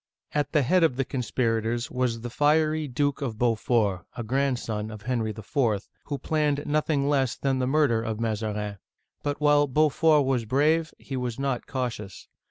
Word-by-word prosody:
At 145 -1 0
the 150 -3 +3
head 180 +7 +3
of 160 -6 +3
the 135 0 -1
conspirators 120 -2 -1
was 125 -3 -1
the 120 0 -6
fiery 155 +2 +2
Duke 145 +2 -1
of 120 -6 -3
Beaufort, 115 -4 +1
— - - -22
a 120 - -3
grandson 120 -4 -1
of 105 -2 -9
Henry 120 -3 -1
IV., 110 0 -1
— - - -42
who 145 - -2
planned 150 -1 0
noth 150 +2 0
ing 140 -3 +2
less 135 -4 +1
than 135 -1 0
the 125 - 0
murder 135 -5 +3
of 110 -1 -3
Mazarin. 105 -2 -2 0.4
But 145 0 -2
while 145 -1 +4
Beau 150 +3 +3
fort 155 -1 +3
was 130 -3 0
brave, 155 +7 +2
he 135 - -7
was 125 -3 -3
not 135 -2 -2
cautious. 120 -7 -4
130 Hz, 185 wpm, -26 LUFS, 115-145 Hz, 0.4 s, while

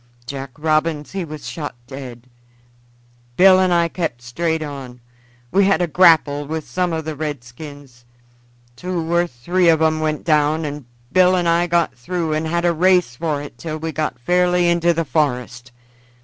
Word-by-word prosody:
Jack 135 +1 -6
Robins 155 0 0
he 195 -1 -3
was 155 -2 -8
shot 150 -6 -5
dead. 125 -2 -9 1.1
Bill 185 0 +7
and 185 -1 +2
I 170 -1 +3
kept 160 -9 -4
straight 160 +6 -2
on. 135 -4 -8 0.5
We 200 +3 +4
had 195 0 +3
a 175 - +2
grapple 155 -4 +4
with 160 0 -4
some 180 -1 -1
of 160 -1 -3
the 155 -1 -4
redskins; 140 -2 -8 0.7
two 170 +2 -3
or 175 0 +3
three 170 +7 +1
on 160 -1 +4
'em 155 0 +2
went 155 -1 -2
down, 155 0 +2
and 145 -2 -6 0.3
Bill 185 +3 +5
and 175 -2 0
I 170 +1 +2
got 170 -4 +1
through 160 +6 -3
and 155 +1 -1
had 170 +2 -1
a 170 - +3
race 180 -6 +2
for 150 0 -2
it 145 - -11
till 155 -2 -5
we 160 +1 -4
got 155 -4 -3
fairly 180 +6 +2
into 170 0 +3
the 165 -1 -1
forest. 125 -4 -2
155 Hz, 175 wpm, -20 LUFS, 145-170 Hz, 1.1 s, Bill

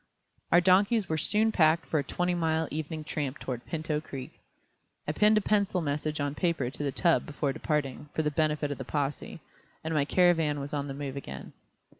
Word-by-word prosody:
Our 175 - +6
donkeys 195 +3 +4
were 160 - -1
soon 215 +7 +2
packed 160 -3 +3
for 155 - 0
a - - -1
twenty 180 +5 -1
mile 160 -2 0
evening 155 +1 -4
tramp 150 -2 -3
toward 125 -2 -5
Pinto 155 -2 -2
Creek. 135 -4 -7 0.8
I - - +1
pinned 210 +6 +4
a - - +3
penciled 200 -3 +1
message 150 +1 -2
on 145 0 -1
paper 150 -6 0
to 145 - -5
the 140 - 0
tub 170 +3 +2
before 145 -1 -2
departing, 150 -2 -2
for 160 - +1
the 150 - 0
benefit 150 -1 0
of 145 - -5
the - - -3
possè, 145 +4 -3 0.4
and 160 +1 -2
my 145 -2 +2
caravan 165 -3 +3
was 140 +1 -6
on 145 -1 -2
the 135 - -5
move 140 -1 -5
again. 140 - -8
155 Hz, 200 wpm, -29 LUFS, 145-170 Hz, 0.8 s, Our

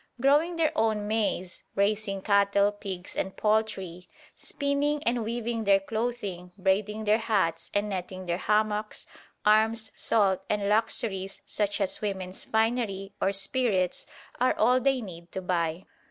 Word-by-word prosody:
Growing 295 +7 +3
their 325 -2 +1
own 215 -2 +1
maize, 210 -4 -1
raising 200 -1 0
cattle, 200 0 +3
pigs 195 -3 -7
and 190 - -3
poultry, 195 -5 -1 0.3
spinning 285 +1 -1
and 235 0 +1
weaving 230 0 -2
their 200 -1 +5
clothing, 200 -4 -3
braiding 205 +3 0
their 215 +1 +3
hats 200 -7 0
and 205 +1 0
netting 185 -1 -5
their 175 0 -1
hammocks, 215 0 0 0.4
arms, 220 0 +3
salt, 195 -4 +2
and 205 -1 0
luxuries 205 -2 +1
such 205 -1 -1
as 195 -2 0
women's 190 -3 -4
finery 220 -4 0
or 195 - +3
spirits 195 -2 0 0.3
are 255 +1 +3
all 250 +1 +4
they 270 0 +2
need 170 -5 -10
to - - -3
buy. 175 -2 -1
210 Hz, 140 wpm, -28 LUFS, 190-225 Hz, 0.4 s, their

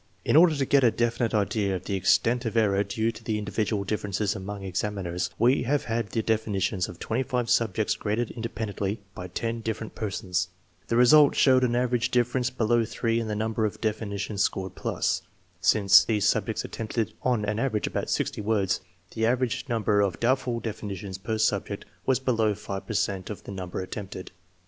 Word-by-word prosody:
In - - +2
order 165 0 +7
to 140 -2 0
get 140 0 +4
a 120 - +7
definite 120 0 0
idea 100 -1 +1
of 90 - -5
the 100 - -3
extent 100 +6 +2
of 115 0 -2
error 100 -3 +3
due 110 +3 -1
to 115 - -13
the 110 -1 -1
in 105 - -4
dividual 105 0 -1
differences 105 0 -1
among 100 0 -6
examiners, 95 -2 -2
we 125 +4 +4
have 145 +4 0
had 115 -2 -2
the 110 +2 -1
definitions 100 -4 0
of - - -9
5 125 0 -1
subjects 115 -2 +2
graded 110 +2 -2
independently 110 -3 -3
by 90 - -7
10 115 +6 -3
dif 110 -1 -2
ferent 110 - -8
persons. 95 -3 -2 0.4
The 115 - +1
result 145 +4 +7
showed 130 -2 +5
an 120 -1 +2
average 125 -1 +1
difference 125 +1 +1
below 120 -2 +2
3 115 +1 -1
in 115 - -3
the 105 - -2
number 110 +1 -1
of 105 - -1
definitions 105 -2 -2
scored 95 -1 -1
plus. - - -1 0.4
Since 100 -1 +6
these 105 -2 +1
subjects 110 0 0
attempted 115 0 -3
on 120 -5 +1
an 105 +1 -1
average 115 -4 0
about - - -3
60 - - -1
words, 100 -3 +1 0.3
the 110 0 0
average 125 -1 0
number 105 -3 +2
of 95 -4 0
doubtful 125 -1 +1
definitions 100 -3 -5
per 110 +3 -2
subject 110 - 0 0.2
was 130 -1 +3
below 115 -5 +1
5 100 0 -6
per 110 - -3
cent 95 -2 -1
of 105 - -7
the - - -8
number 95 -2 -5
attempted. 95 0 -7
110 Hz, 185 wpm, -26 LUFS, 100-120 Hz, 0.4 s, order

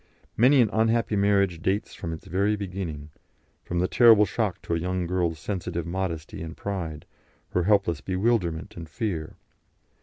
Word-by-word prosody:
Many 130 +4 +5
an 110 -3 +2
unhappy 115 0 +2
marriage 100 -4 +2
dates 100 +4 -1
from 80 - -6
its 80 - -7
very 100 +4 +1
beginning, 90 -7 -5 0.5
from 85 - -4
the 90 +1 +2
terrible 115 -2 +6
shock 105 -1 -2
to - - -3
a 85 - +1
young 90 +1 -2
girl's 85 -2 -1
sensitive 85 -2 -4
modesty 85 -3 -4
and 80 -1 -7
pride, 85 -7 -4 0.4
her 90 -1 0
helpless 100 -7 +2
bewilderment 95 -4 -1
and 85 -2 -8
fear. 90 -10 -3
95 Hz, 155 wpm, -26 LUFS, 85-105 Hz, 0.5 s, terrible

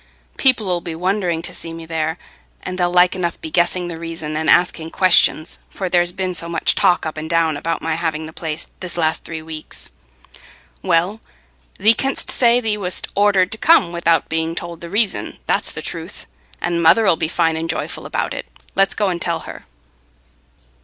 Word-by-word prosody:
People 235 -8 +3
'ull 175 -1 0
be 170 -2 -6
wondering 180 -1 -1
to 180 - -6
see 165 - -6
me 165 0 -8
there, 160 0 -2 0.5
and 185 - -4
they'll 175 0 +2
like 180 0 +4
enough 175 -2 -2
be 160 - -7
guessing 175 +1 +1
the 165 -2 -6
reason 165 -2 -5
and 155 +1 -1
asking 170 -2 +3
questions, 170 -3 +3
for 190 -2 -4
there's 175 0 +2
been 185 0 -3
so 170 -1 0
much 165 -1 +1
talk 185 -3 +2
up 155 0 -4
and 155 +1 -6
down 165 -2 +2
about 165 +3 -3
my 165 0 0
having 160 -1 -2
the 160 - -10
place, 160 -2 -4
this 180 -2 -5
last 160 -1 0
three 160 -1 -7
weeks." 155 -1 -9 0.9
"Well, 185 +4 +1 0.6
thee 220 +3 +6
canst 270 +4 0
say 240 -1 +4
thee 220 -3 -1
wast 180 -2 -2
ordered 200 -2 +3
to 220 - -5
come 245 - +5
without 170 -2 +1
being 160 +1 -2
told 170 -1 -6
the 170 - -7
reason. 205 +2 0
That's - - +1
the - - -7
truth. - - -7 0.3
And 170 -1 -1
mother 170 +7 +5
'ull 190 - +5
be 160 - -1
fine 165 -1 +1
and 165 +1 -3
joyful 160 - -4
about - - -2
it. - - -6 0.3
Let's 195 0 +2
go 205 -2 +1
and 175 -2 -3
tell 165 -2 -1
her." - - -10
170 Hz, 195 wpm, -19 LUFS, 160-185 Hz, 0.9 s, thee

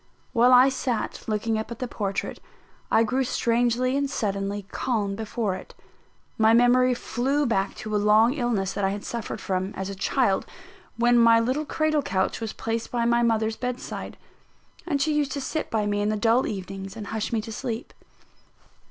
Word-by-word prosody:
While 245 0 +5
I 250 +1 +8
sat 255 -3 -3
looking 220 +1 0
up 220 - -5
at 235 - -6
the 250 - -3
portrait, 200 -4 -3 0.5
I 225 - +4
grew 255 +4 0
strangely 245 +1 +1
and 280 0 0
suddenly 200 -3 -2
calm 210 -6 -1
before 220 -1 -2
it. 185 - -9 0.6
My 220 +1 +5
memory 250 +1 +4
flew 270 +5 -1
back 195 -5 0
to 215 -1 -4
a - - +4
long 215 +4 +5
illness 235 -9 -1
that 200 - -3
I 195 - +3
had 200 +1 -5
suffered 235 -2 -4
from, 190 +1 -2
as 190 0 -4
a - - -4
child, 190 - +1 0.5
when 240 0 +4
my 230 -1 +6
little 260 +6 0
cradle 310 -1 +1
couch 190 -5 -1
was 225 -1 -3
placed 225 0 -3
by 235 -1 0
my 235 0 +3
mother's 225 -1 +1
bedside, 250 0 -5 0.7
and 290 -5 0
she 310 +2 +1
used 290 -2 0
to 285 - -3
sit 315 +3 -3
by 215 -2 0
me 205 0 0
in 205 - +1
the 215 - 0
dull 230 +4 +3
evenings 195 0 -6
and 215 - -6
hush 220 +1 -3
me 230 - +1
to 225 +1 -6
sleep. 230 +1 -5
230 Hz, 185 wpm, -25 LUFS, 210-250 Hz, 0.7 s, I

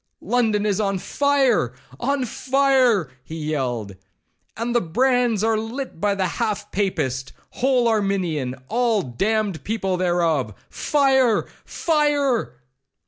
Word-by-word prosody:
—London 220 -4 +1
is 205 -2 +1
on 195 -2 0
fire!—on 260 - 0
fire!' 260 - +2
he 160 - -8
yelled; 130 -10 -3 0.6
'and 230 +2 -2
the 240 - +3
brands 245 +3 +1
are 225 -1 +2
lit 230 -3 -6
by 205 -1 +2
the 190 -1 0
half 200 +3 -2
papist, 145 -10 -2 0.2
whole 255 -2 +2
arminian, 185 - 0
all 230 -4 +1
damned 195 - -1
people 195 -4 -1
thereof.—Fire!—fire!' 245 - +1
215 Hz, 100 wpm, -22 LUFS, 170-250 Hz, 0.6 s, the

